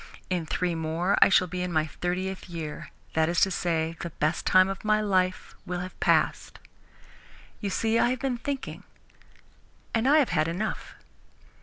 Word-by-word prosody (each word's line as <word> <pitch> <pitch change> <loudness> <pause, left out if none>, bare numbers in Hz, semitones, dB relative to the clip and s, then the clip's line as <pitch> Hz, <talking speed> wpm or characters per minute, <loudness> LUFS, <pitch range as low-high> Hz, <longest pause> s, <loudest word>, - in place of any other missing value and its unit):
In 175 -3 -1
three 180 +1 -1
more 165 +4 0
I - - +8
shall 190 - +5
be 180 +1 -4
in 180 0 -2
my 155 -2 +2
thirtieth 185 +4 -4
year 160 -3 -6 0.2
that 160 0 +2
is 170 -1 +1
to 190 - +4
say, 165 -2 -1
the 170 - -4
best 155 0 -1
time 185 0 +6
of 195 0 -5
my 215 0 +3
life 185 -3 0
will 180 -2 -4
have 185 +1 -8
passed. - - +1 1.0
You 205 - -3
see, 225 +4 +1
I - - +4
have 255 0 -1
been 255 -3 -2
thinking, 275 +1 -4 1.1
and 230 +2 +1
I 295 +3 +6
have 290 -5 +3
had 155 -3 +1
enough." 185 +6 -4
180 Hz, 175 wpm, -27 LUFS, 165-205 Hz, 1.1 s, I